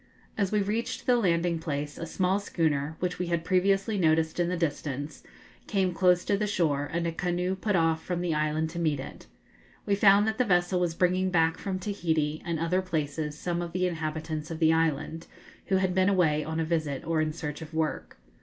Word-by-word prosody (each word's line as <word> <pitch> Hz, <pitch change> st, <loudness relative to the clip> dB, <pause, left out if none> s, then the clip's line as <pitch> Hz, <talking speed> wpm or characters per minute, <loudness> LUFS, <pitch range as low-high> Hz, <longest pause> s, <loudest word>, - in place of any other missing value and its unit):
As 200 Hz, -3 st, 0 dB
we 210 Hz, -1 st, +2 dB
reached 220 Hz, +4 st, -3 dB
the 250 Hz, -, +4 dB
landing 170 Hz, -6 st, +1 dB
place, 145 Hz, -2 st, -4 dB
a 165 Hz, -, -4 dB
small 185 Hz, +4 st, +1 dB
schooner, 160 Hz, -6 st, -1 dB
which 180 Hz, -1 st, -2 dB
we 180 Hz, -, -1 dB
had 170 Hz, -1 st, -1 dB
previously 195 Hz, +3 st, +2 dB
noticed 160 Hz, -1 st, +2 dB
in 175 Hz, 0 st, +2 dB
the 180 Hz, -, -1 dB
distance, 145 Hz, -2 st, -3 dB, 0.5 s
came 190 Hz, -4 st, +1 dB
close 180 Hz, 0 st, +3 dB
to 200 Hz, -, +2 dB
the 210 Hz, +1 st, -1 dB
shore, 150 Hz, -7 st, 0 dB
and 170 Hz, +1 st, -1 dB
a 170 Hz, -, 0 dB
canoe 180 Hz, +1 st, -1 dB
put 205 Hz, +1 st, -1 dB
off 165 Hz, -2 st, +2 dB
from 175 Hz, -1 st, -2 dB
the 175 Hz, -2 st, 0 dB
island 155 Hz, +1 st, 0 dB
to 170 Hz, -, -5 dB
meet 155 Hz, -4 st, +1 dB
it. 130 Hz, -, -9 dB, 0.6 s
We 200 Hz, -, +1 dB
found 200 Hz, +1 st, +5 dB
that 220 Hz, +2 st, -2 dB
the -, -, +5 dB
vessel 180 Hz, -3 st, +2 dB
was 175 Hz, -2 st, 0 dB
bringing 185 Hz, +1 st, +2 dB
back 165 Hz, -2 st, +2 dB
from 190 Hz, -2 st, -3 dB
Tahiti 160 Hz, -6 st, -1 dB
and 170 Hz, -3 st, -2 dB
other 165 Hz, +4 st, +1 dB
places 155 Hz, -4 st, -3 dB
some 175 Hz, +1 st, -2 dB
of 170 Hz, -1 st, -5 dB
the 185 Hz, 0 st, +1 dB
inhabitants 160 Hz, -2 st, -3 dB
of 165 Hz, -, -4 dB
the 160 Hz, 0 st, +4 dB
island, 160 Hz, 0 st, -1 dB, 0.4 s
who 195 Hz, -, +2 dB
had 190 Hz, -1 st, +1 dB
been 185 Hz, +1 st, +3 dB
away 160 Hz, -6 st, +2 dB
on 160 Hz, +1 st, -3 dB
a 160 Hz, -, 0 dB
visit 155 Hz, -4 st, -2 dB
or 165 Hz, -1 st, +1 dB
in 155 Hz, 0 st, 0 dB
search 150 Hz, -1 st, -6 dB
of 160 Hz, 0 st, -8 dB
work. 160 Hz, -1 st, -2 dB
170 Hz, 210 wpm, -28 LUFS, 160-185 Hz, 0.6 s, found